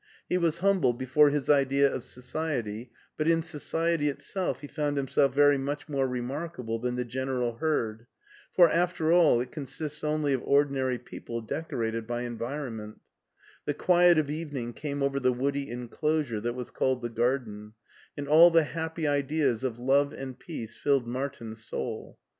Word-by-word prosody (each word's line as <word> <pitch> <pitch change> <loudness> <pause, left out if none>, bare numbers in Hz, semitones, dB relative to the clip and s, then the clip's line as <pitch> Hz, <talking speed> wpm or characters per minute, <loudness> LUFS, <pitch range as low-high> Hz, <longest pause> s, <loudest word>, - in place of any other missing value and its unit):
He 180 - +1
was 170 -1 0
himible 185 -12 +3
before 130 +4 +4
his 145 -2 -1
idea 140 -1 +4
of 120 - -4
society, 125 -4 -3 0.3
but 155 - 0
in 165 0 +3
so 155 -2 -5
ciety 165 -1 +1
itself 185 +6 -3
he 145 - -7
found 145 0 -2
himself 140 0 +2
very 145 +1 +4
much 145 +3 -4
more, 135 -3 0
remark 135 +7 -4
able 115 -2 -3
than 125 +1 -2
the 125 0 -2
general 125 -1 -2
herd, 115 -7 -1 0.4
for, 175 -2 +7
after 170 -1 +1
all, 170 -8 +5
it 125 0 -6
consists 150 +1 -5
only 150 -2 +1
of 130 - 0
ordinary 135 -3 +2
people 120 -1 -7
decorated 115 -3 -3
by 120 0 -2
environment 120 -2 -5 0.7
The 145 - -1
quiet 175 +1 +5
of 150 -2 +1
evening 145 -7 -4
came 145 0 -3
over 140 0 +1
the 130 -1 +3
woody 140 +2 -1
enclosure 125 0 -2
that 120 +2 -2
was 125 -1 -6
called 130 -2 0
the 120 - -2
garden, 115 -3 -2 0.4
and 145 0 -4
all 160 +4 +8
the 165 -1 +4
happy 160 +1 -3
ideas 140 -4 +1
of 125 -3 -2
love 140 +4 +2
and 130 -2 -7
peace 115 - -7
filled 140 -4 +1
Martin's 120 -3 -5
soul. 110 0 -5
140 Hz, 170 wpm, -28 LUFS, 120-155 Hz, 0.7 s, all